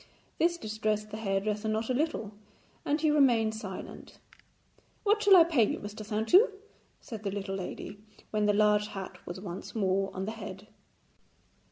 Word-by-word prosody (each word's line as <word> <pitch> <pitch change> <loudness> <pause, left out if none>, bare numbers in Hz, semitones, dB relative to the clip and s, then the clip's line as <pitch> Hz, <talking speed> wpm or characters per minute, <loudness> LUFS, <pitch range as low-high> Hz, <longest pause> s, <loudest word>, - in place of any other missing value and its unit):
This 340 +1 +3
distressed 215 -4 -2
the 215 - -5
hairdresser 210 0 -1
not 220 +3 -1
a - - +2
little, 260 -7 -1 0.5
and 295 +2 0
he 310 -1 +3
remained 240 -7 +4
silent. 205 -4 -8 0.9
'What 420 0 +3
shall 405 -2 +7
I 340 - +9
pay 320 -8 +3
you, 210 - 0
Mr. 210 +1 -7
Saintou?' 220 - +4 0.5
said 225 -3 -8
the 205 - -2
little 195 0 -4
lady, 195 +2 -6 0.3
when 210 -1 +1
the 205 - +4
large 210 0 +3
hat 190 -3 -7
was 175 +2 -6
once 185 +1 -7
more 195 -2 +1
on 190 +1 -3
the 215 - -3
head. 205 -2 -9
215 Hz, 165 wpm, -30 LUFS, 200-235 Hz, 0.9 s, I